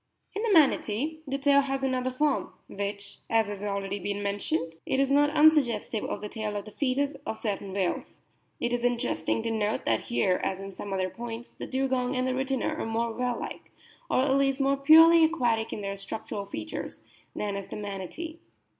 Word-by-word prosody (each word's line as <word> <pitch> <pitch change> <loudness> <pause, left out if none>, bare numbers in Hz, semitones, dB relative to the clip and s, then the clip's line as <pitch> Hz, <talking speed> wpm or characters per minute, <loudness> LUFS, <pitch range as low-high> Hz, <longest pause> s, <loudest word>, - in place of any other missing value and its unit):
In 410 - -2
the 460 -1 +1
Manatee 305 - +3
the 275 0 -1
tail 280 0 +5
has 270 -1 -2
another 255 -1 0
form, 280 +3 0
which, 200 0 -5
as 225 -1 +3
has 205 -1 -6
already 200 -1 -2
been 200 +2 -3
mentioned, 165 -5 -1
is 270 +1 +1
not 290 +1 +5
unsuggestive 295 -8 +3
of - - -4
the 210 - -4
tail 215 -1 -4
of 205 - -4
the 215 - -10
foetus 280 +3 0
of 220 - -4
certain 200 -3 -3
whales. 190 -2 -2 0.4
It 240 - -1
is 240 0 -1
interesting 245 -2 0
to 230 - -1
notice 215 -1 -1
that 110 -1 +2
here, 120 +10 +1
as 190 - -1
in 195 0 -7
some 200 +2 -7
other 185 -1 -1
points, 235 0 -7
the - - -8
Dugong 260 -1 0
and 255 0 0
the - - +1
Rhytina 265 -2 -1
are - - -1
more 230 +1 -1
whale 245 0 -1
like, - - -7 0.4
or - - +3
at 265 0 +2
least 275 0 +2
more 275 0 +3
purely 325 +4 +8
aquatic 240 -9 +1
in - - -4
their 200 0 -4
structural 200 0 -5
features, 110 - -6 0.3
than 205 -1 -2
is 200 -1 -5
the - - -7
Manatee. 210 - -6
235 Hz, 195 wpm, -28 LUFS, 200-275 Hz, 0.4 s, purely